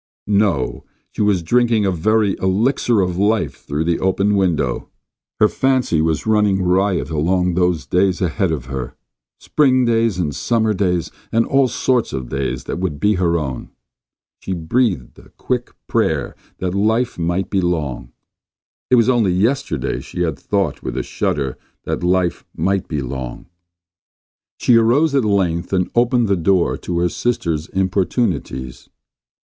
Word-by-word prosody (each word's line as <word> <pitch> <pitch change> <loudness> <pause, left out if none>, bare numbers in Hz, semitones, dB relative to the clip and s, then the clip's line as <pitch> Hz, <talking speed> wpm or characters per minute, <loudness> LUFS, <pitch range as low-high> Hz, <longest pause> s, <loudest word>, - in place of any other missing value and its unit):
No; 100 -10 +1 0.3
she - - -4
was 100 -4 +2
drinking 115 +3 +2
in 100 - +2
a - - +1
very 105 +3 +1
elixir 110 +3 +2
of 90 -1 -1
life 105 +3 +1
through 75 +2 -2
that 85 0 0
open 100 +2 +2
window. 90 -5 0 0.5
Her 105 - +6
fancy 130 -11 +1
was 80 -1 0
running 105 -3 +2
riot 95 0 +1
along 90 +4 +1
those 90 -2 +1
days 95 0 +1
ahead 90 0 0
of 70 -6 -3
her. 65 -2 -5 0.4
Spring 130 -4 +2
days, 115 -4 +1
and 80 -5 -1
summer 110 -2 +1
days, 90 -4 0 0.2
and 115 +1 +2
all 135 -1 +3
sorts 125 -1 0
of 65 -2 -4
days 65 -1 -3
that - - -4
would 90 -6 -3
be 105 +5 +3
her 85 -1 +2
own. 65 -5 -4 0.7
She 95 - -4
breathed 90 - -1
a - - -17
quick 125 -1 -2 0.2
prayer - - 0 0.2
that 90 -1 -2
life 110 +3 +1
might 85 +3 -1
be 95 - +2
long. 75 -9 -2 0.8
It 130 - +5
was 115 -1 +4
only 120 -7 +3
yesterday 115 +10 0
she 90 - -6
had 80 -3 -2
thought - - -1
with 65 0 -5
a 65 - -1
shudder 70 -3 -2 0.2
that - - -3
life 90 -1 +1
might 95 0 0
be 75 -4 -3
long. 65 -3 -6 1.1
She 120 - +4
arose 135 +7 +3
at 135 -3 +3
length 95 -5 0
and 90 -2 0
opened 120 0 +2
the 100 - +2
door 90 0 +2
to 90 - -4
her 90 - +2
sister's 85 -9 -1
importunities. 95 - -2
95 Hz, 155 wpm, -19 LUFS, 85-110 Hz, 1.1 s, Her